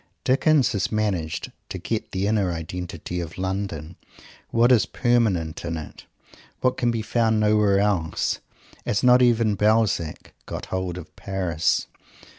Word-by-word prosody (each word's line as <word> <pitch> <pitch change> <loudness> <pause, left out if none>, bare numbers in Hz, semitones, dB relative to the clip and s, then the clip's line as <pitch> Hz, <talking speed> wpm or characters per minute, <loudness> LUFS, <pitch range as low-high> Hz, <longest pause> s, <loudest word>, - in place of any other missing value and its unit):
Dickens 135 0 +3
has 100 - -1
managed 100 -7 -1 0.2
to - - -4
get - - -3
the 95 +1 -1
inner 100 -3 +1
identity 85 +1 -5
of 85 -1 -6
London; 95 -4 -4 0.5
what 120 +2 +4
is 115 -5 +4
permanent 100 -10 +1
in 85 -1 -3
it; 80 - -10 0.5
what 130 0 +1
can 120 - +1
be 115 -2 -1
found 110 -1 +1
nowhere 105 -2 +3
else; 100 -6 0 0.4
as 100 - -1
not 125 0 +6
even 115 -3 +3
Balzac 105 -6 +1
got - - -5
hold 95 -1 -2
of 90 -1 -10
Paris. 90 -5 0
100 Hz, 140 wpm, -24 LUFS, 85-115 Hz, 0.5 s, not